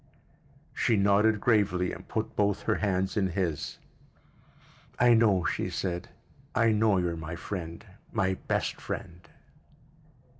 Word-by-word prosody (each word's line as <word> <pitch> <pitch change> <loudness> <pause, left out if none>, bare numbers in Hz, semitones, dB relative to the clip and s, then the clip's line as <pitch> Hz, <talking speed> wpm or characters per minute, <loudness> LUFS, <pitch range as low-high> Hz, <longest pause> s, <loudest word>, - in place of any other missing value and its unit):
She 115 - +2
nodded 105 +2 +3
gravely 100 -5 +2
and - - -10
put - - -3
both 100 -1 +1
her - - +2
hands 95 -2 0
in 100 -3 +2
his. 85 -4 -2 1.2
"I 120 -1 +6
know," 105 -6 +4
she - - -1
said. 90 -1 -3 0.5
"I 115 0 +4
know 105 -2 +3
you're 90 -2 0
my 80 +1 -6
friend, 85 -2 -6 0.3
my 95 0 +1
best - - -2
friend." 85 0 -6
95 Hz, 125 wpm, -28 LUFS, 90-105 Hz, 1.2 s, I